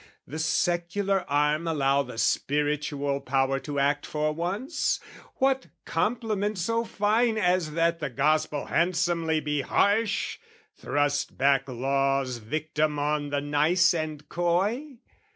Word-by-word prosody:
"The 155 Hz, -, -6 dB
secular 175 Hz, +4 st, 0 dB
arm 150 Hz, +3 st, +1 dB
allow 140 Hz, -3 st, +2 dB
the 125 Hz, -4 st, -8 dB
spiritual 145 Hz, +1 st, 0 dB
power 135 Hz, 0 st, +1 dB
"To 145 Hz, 0 st, -6 dB
act 145 Hz, +1 st, +1 dB
for 150 Hz, 0 st, -1 dB
once? 190 Hz, -, -1 dB, 0.4 s
what 265 Hz, 0 st, +1 dB, 0.2 s
compliment 210 Hz, +1 st, -1 dB
so 230 Hz, +6 st, 0 dB
fine 220 Hz, +1 st, +1 dB
"As 180 Hz, -5 st, +1 dB
that 165 Hz, +1 st, +1 dB
the 150 Hz, -, -3 dB
Gospel 150 Hz, +3 st, +1 dB
handsomely 170 Hz, -2 st, +1 dB
be 150 Hz, -1 st, -1 dB
harsh, 205 Hz, -, +1 dB, 0.4 s
"Thrust 145 Hz, 0 st, -1 dB
back 135 Hz, 0 st, +3 dB
Law's 135 Hz, 0 st, 0 dB
victim 150 Hz, +5 st, -1 dB
on 145 Hz, 0 st, -1 dB
the 145 Hz, 0 st, -1 dB
nice 155 Hz, +5 st, +3 dB
and 155 Hz, -2 st, -4 dB
coy?" 205 Hz, -, -1 dB
155 Hz, 120 wpm, -27 LUFS, 145-185 Hz, 0.4 s, back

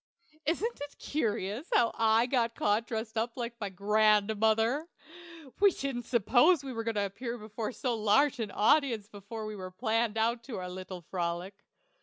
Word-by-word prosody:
Isn't 395 Hz, +5 st, -1 dB
it 290 Hz, 0 st, -7 dB
curious 225 Hz, -, -2 dB
how 235 Hz, -, +4 dB
I 225 Hz, +1 st, +3 dB
got 240 Hz, -3 st, 0 dB
caught 215 Hz, +3 st, +1 dB
dressed 220 Hz, 0 st, -3 dB
up 230 Hz, +2 st, -3 dB
like 235 Hz, -1 st, -3 dB
my 205 Hz, -, -2 dB
grandmother? 215 Hz, -, +2 dB, 0.7 s
We 400 Hz, 0 st, +7 dB
didn't 265 Hz, -7 st, -4 dB
suppose 255 Hz, -, +4 dB
we 265 Hz, -2 st, -5 dB
were 225 Hz, -1 st, -3 dB
going 225 Hz, -1 st, -2 dB
to 205 Hz, -1 st, +1 dB
appear 235 Hz, +5 st, -5 dB
before 215 Hz, +1 st, -5 dB
so 250 Hz, -1 st, -2 dB
large 230 Hz, +6 st, +3 dB
an 220 Hz, -3 st, -2 dB
audience 225 Hz, 0 st, +2 dB
when 210 Hz, +2 st, -7 dB
we 185 Hz, 0 st, -6 dB
planned 225 Hz, -1 st, 0 dB
out 230 Hz, +3 st, 0 dB
our 185 Hz, -7 st, -4 dB
little 185 Hz, -1 st, -7 dB
frolic. 175 Hz, +2 st, -3 dB
225 Hz, 160 wpm, -30 LUFS, 205-245 Hz, 0.7 s, We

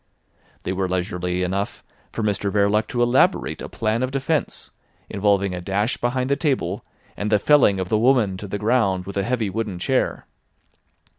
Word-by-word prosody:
They 95 Hz, -, -2 dB
were 95 Hz, -1 st, -1 dB
leisurely 90 Hz, -1 st, -1 dB
enough 95 Hz, +3 st, -3 dB, 0.3 s
for 115 Hz, -, -3 dB
Mr 100 Hz, -1 st, 0 dB
Verloc 105 Hz, +1 st, +2 dB
to 120 Hz, -1 st, 0 dB
elaborate 120 Hz, +2 st, +2 dB
a -, -, -6 dB
plan 110 Hz, +1 st, -1 dB
of 130 Hz, -, 0 dB
defence 140 Hz, +3 st, -2 dB, 0.4 s
involving 100 Hz, -1 st, +1 dB
a 90 Hz, -, -4 dB
dash 100 Hz, +5 st, -1 dB
behind 125 Hz, +1 st, -1 dB
the -, -, +4 dB
table, 140 Hz, -4 st, -1 dB, 0.3 s
and 105 Hz, +1 st, -3 dB
the 105 Hz, -, +5 dB
felling 105 Hz, -5 st, +4 dB
of 95 Hz, -1 st, -3 dB
the 110 Hz, -, +2 dB
woman 120 Hz, -5 st, +3 dB
to 105 Hz, -, -7 dB
the 105 Hz, -, -3 dB
ground 100 Hz, -4 st, +1 dB
with 100 Hz, -, -7 dB
a 100 Hz, -, +1 dB
heavy 115 Hz, -2 st, -1 dB
wooden 105 Hz, -2 st, -3 dB
chair. 130 Hz, +9 st, -1 dB
105 Hz, 175 wpm, -22 LUFS, 95-120 Hz, 0.4 s, the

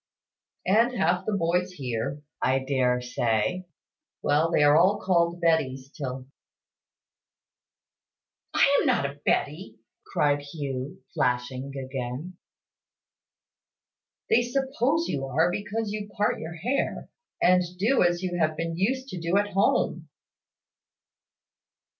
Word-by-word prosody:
"And 230 Hz, +6 st, +3 dB
half 180 Hz, 0 st, +1 dB
the 215 Hz, -, 0 dB
boys 180 Hz, +1 st, 0 dB
here, 130 Hz, 0 st, -4 dB, 0.2 s
I 130 Hz, +1 st, +3 dB
dare 130 Hz, -2 st, +1 dB
say. 125 Hz, +8 st, -1 dB, 0.6 s
Well, 150 Hz, +3 st, +3 dB
they 150 Hz, -, +3 dB
are 145 Hz, 0 st, +6 dB, 0.2 s
called 170 Hz, -2 st, +1 dB
Bettys 140 Hz, -6 st, +1 dB
till 130 Hz, -3 st, -5 dB, 1.5 s
" -, -, -60 dB
"I 280 Hz, 0 st, +5 dB
am -, -, +1 dB
not 240 Hz, -, +2 dB
a 140 Hz, +1 st, -5 dB
Betty," 145 Hz, -7 st, -1 dB, 0.3 s
cried 145 Hz, -1 st, +2 dB
Hugh, 140 Hz, -3 st, -6 dB
flashing 125 Hz, +2 st, -1 dB
again. 130 Hz, +5 st, -5 dB, 1.9 s
"They 240 Hz, -, +4 dB
suppose 270 Hz, +5 st, 0 dB
you 135 Hz, -1 st, -2 dB
are, 160 Hz, +7 st, +2 dB
because 210 Hz, +2 st, -3 dB
you 210 Hz, -1 st, -5 dB
part 205 Hz, +1 st, 0 dB
your 160 Hz, +1 st, -6 dB
hair, 245 Hz, -, -2 dB, 0.3 s
and 180 Hz, 0 st, +5 dB, 0.2 s
do 225 Hz, +8 st, +2 dB
as 175 Hz, +1 st, +2 dB
you 175 Hz, -1 st, -2 dB
have 155 Hz, -1 st, +1 dB
been 165 Hz, 0 st, -2 dB
used 260 Hz, +9 st, -1 dB
to 180 Hz, -, -5 dB
do 170 Hz, +3 st, +1 dB
at 205 Hz, 0 st, +1 dB
home." 175 Hz, -4 st, +1 dB
165 Hz, 120 wpm, -26 LUFS, 135-195 Hz, 1.9 s, are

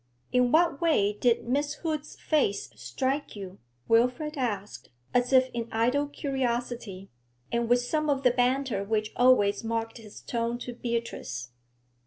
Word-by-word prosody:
'In 250 Hz, -1 st, +3 dB
what 330 Hz, -3 st, +3 dB
way 250 Hz, -12 st, +3 dB
did 235 Hz, +2 st, +1 dB
Miss 285 Hz, +4 st, 0 dB
Hood's 305 Hz, -2 st, -4 dB
face 290 Hz, -10 st, 0 dB
strike 260 Hz, -, -2 dB
you?' 195 Hz, -2 st, -8 dB, 0.3 s
Wilfrid 250 Hz, +7 st, +2 dB
asked, 210 Hz, -7 st, -3 dB, 0.2 s
as 245 Hz, +1 st, +2 dB
if 260 Hz, -1 st, +5 dB
in 235 Hz, -1 st, -3 dB
idle 250 Hz, +6 st, +1 dB
curiosity, 240 Hz, -8 st, -3 dB, 0.4 s
and 235 Hz, -1 st, 0 dB
with 245 Hz, 0 st, +4 dB
some 305 Hz, +5 st, -1 dB
of 275 Hz, -1 st, +1 dB
the 250 Hz, -, +5 dB
banter 250 Hz, -3 st, +1 dB
which 215 Hz, +1 st, -1 dB
always 235 Hz, -5 st, +4 dB
marked 225 Hz, +1 st, -3 dB
his 215 Hz, -2 st, -12 dB
tone 235 Hz, 0 st, -2 dB
to 245 Hz, 0 st, -6 dB
Beatrice. 230 Hz, -, -4 dB
245 Hz, 145 wpm, -28 LUFS, 225-270 Hz, 0.4 s, if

